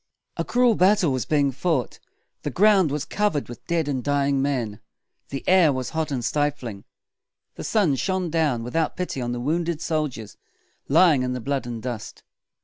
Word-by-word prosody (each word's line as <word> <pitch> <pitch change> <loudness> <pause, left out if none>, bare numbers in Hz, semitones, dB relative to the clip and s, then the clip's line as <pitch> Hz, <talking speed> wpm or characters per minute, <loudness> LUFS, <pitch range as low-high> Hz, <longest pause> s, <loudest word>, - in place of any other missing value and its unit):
A - - -1
cruel 245 -1 +3
battle 190 -4 +3
was 130 -2 -2
being 145 -3 +2
fought. 140 -1 -1 0.4
The - - -3
ground 190 - +4
was 145 0 -2
covered 205 -9 -1
with 120 - -10
dead 165 -3 0
and 130 -4 -2
dying 140 -1 +1
men. 125 -7 -2 0.5
The 135 - -6
air 180 -5 +5
was 130 -2 -3
hot 160 -1 -2
and 125 -4 -2
stifling. 140 -9 -2 0.7
The - - -8
sun 195 -11 +2
shone 185 +2 -1
down 150 -8 +1
without 155 +7 -1
pity 180 -7 -3
on 120 0 -2
the 120 - -3
wounded 165 +4 -1
soldiers 150 - -3 0.5
lying 155 -2 +5
in 125 0 -1
the 125 - -3
blood 135 +1 -2
and 115 -2 -6
dust. 120 -4 -6
145 Hz, 175 wpm, -24 LUFS, 125-170 Hz, 0.7 s, air